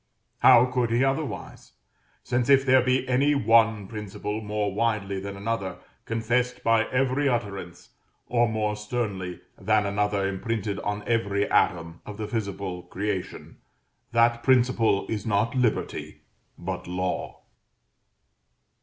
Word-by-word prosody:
How 125 -1 +7
could 125 -2 0
he 120 +3 +2
otherwise? 135 +2 -3 0.5
since 120 +1 -1
if 135 -1 +6
there 130 -1 +5
be 130 +1 +1
any 140 +3 +3
one 115 -4 +3
principle 105 0 -5
more 105 -2 -2
widely 105 -3 -1
than 100 +1 -6
another 100 -3 -3 0.3
confessed 120 +3 -1
by 115 0 +3
every 135 +3 +1
utterance, 100 -8 -4 0.4
or 120 -1 +2
more 105 -1 -1
sternly 105 -5 -4 0.2
than 105 +1 +2
another 100 0 0
imprinted 100 +1 -3
on 105 0 -3
every 100 -3 0
atom, 85 -2 +1
of 105 -1 -9
the 110 - -3
visible 100 -5 -4
creation, 95 +1 -5 0.5
that 115 0 +3
principle 125 -5 +3
is 105 -3 -3
not 110 +2 +1
Liberty, 125 -4 -1 0.4
but 90 0 -5
Law. 90 0 -3
110 Hz, 125 wpm, -26 LUFS, 100-120 Hz, 0.5 s, How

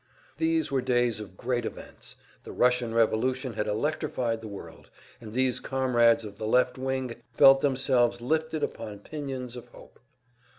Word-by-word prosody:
These 325 0 +1
were 135 - +1
days 120 -3 +1
of 95 -3 -10
great 120 0 -1
events; - - -8 0.3
the - - -9
Russian 125 -1 +2
revolution 125 +3 +1
had 105 0 -2
electrified 120 -1 -1
the 110 - -7
world, 100 -2 -10 0.3
and 110 -2 -9
these 130 +1 +1
comrades 120 -4 +2
of 100 -1 -10
the 110 - -3
"left 125 +3 +2
wing" 130 -2 -3 0.2
felt 135 +2 +7
themselves 130 -3 +2
lifted 155 +5 -1
upon 105 -2 -5
pinions 130 -3 -6
of 120 0 -9
hope. - - -17
125 Hz, 155 wpm, -27 LUFS, 115-135 Hz, 0.3 s, felt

